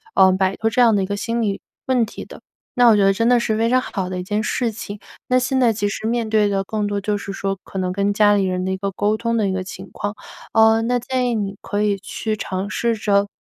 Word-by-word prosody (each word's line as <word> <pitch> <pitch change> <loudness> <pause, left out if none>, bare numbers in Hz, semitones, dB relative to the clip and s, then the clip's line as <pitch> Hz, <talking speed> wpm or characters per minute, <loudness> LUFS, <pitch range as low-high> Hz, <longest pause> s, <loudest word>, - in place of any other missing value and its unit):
嗯， 190 0 +6
摆 190 0 +1
脱 225 - +1
这 235 +3 +1
样 235 -2 +6
的 195 - +1
一 - - -1
个 200 +1 -3
心 230 +3 -2
理 200 -3 -1 0.2
问 250 -3 +2
题 215 - -9
的。 - - -13 0.3
那 245 -2 +5
我 220 - +6
觉 200 - +3
得 195 - +4
真 230 +4 +1
的 245 -1 +5
是 220 -2 0
非 225 +1 +1
常 255 +1 +4
好 190 -7 -4
的 185 - -4
一 180 - -4
件 210 +3 -1
事 235 +1 -1
情， 205 -1 -7 0.3
那 255 0 +3
现 255 +1 0
在 240 -3 +4
其 205 -1 -1
实 205 - -4
面 230 -1 -1
对 215 -1 +3
的 195 -1 0
更 210 +1 -2
多 205 0 -1
就 205 +1 -1
是 200 - -6
说 195 0 -3
可 195 - -6
能 180 -1 -1
跟 200 +1 0
家 205 0 +4
里 200 - +2
人 185 -1 -1
的 190 - -1
一 190 - -2
个 195 +1 -3
沟 205 +2 0
通 230 +1 -1
的 210 -3 +1
一 190 - -1
个 190 0 -2
情 190 +1 -9
况。 205 +1 -4 0.4
呃， 220 0 +5
那 245 +2 0
建 250 0 -1
议 235 - 0
你 200 -2 -2
可 205 +1 -2
以 205 -1 +1
去 215 +2 -3
尝 190 -1 -4
试 235 +2 0
着， 200 -1 +1
210 Hz, 305 characters per minute, -21 LUFS, 195-230 Hz, 0.4 s, 嗯